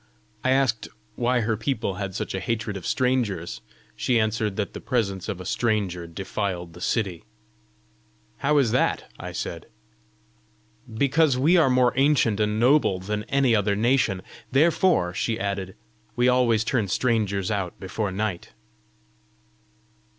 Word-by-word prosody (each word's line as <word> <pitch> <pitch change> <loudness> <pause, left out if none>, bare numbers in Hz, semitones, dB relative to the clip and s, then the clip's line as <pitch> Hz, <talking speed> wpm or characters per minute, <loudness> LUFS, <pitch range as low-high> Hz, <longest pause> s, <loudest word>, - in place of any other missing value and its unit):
I - - +1
asked 130 -4 +2 0.3
why 125 0 +1
her 115 0 0
people 110 -2 -2
had 95 -2 -4
such - - -3
a 95 - -2
hatred 115 0 -2
of 95 - -6
strangers. 105 - -1 0.3
She 120 -2 +1
answered 110 -2 0
that 105 -1 -3
the - - -7
presence 100 -7 -1
of 100 -4 -4
a 90 - -8
stranger 100 -6 -1
defiled 90 -1 -4
the 90 - -12
city. 95 -6 -1 1.1
"How 150 +2 +2
is 130 -6 +3
that?" 125 - 0
I - - -6
said. - - -5 1.2
"Because 140 +4 +2
we 155 +8 +4
are 165 -6 +5
more 125 -1 +3
ancient 135 -6 +3
and 105 0 +1
noble 125 -5 +4
than 105 +3 -3
any 135 -2 +2
other 100 -1 +1
nation. 110 -4 +1 0.3
Therefore," 155 - +3
she 110 +4 -1
added, 100 -1 -3 0.4
"we 120 +1 +3
always 125 -3 +3
turn 120 -3 0
strangers 105 -3 0
out 95 -4 -3
before 95 +1 -3
night." 95 -2 -3
110 Hz, 145 wpm, -25 LUFS, 95-125 Hz, 1.2 s, are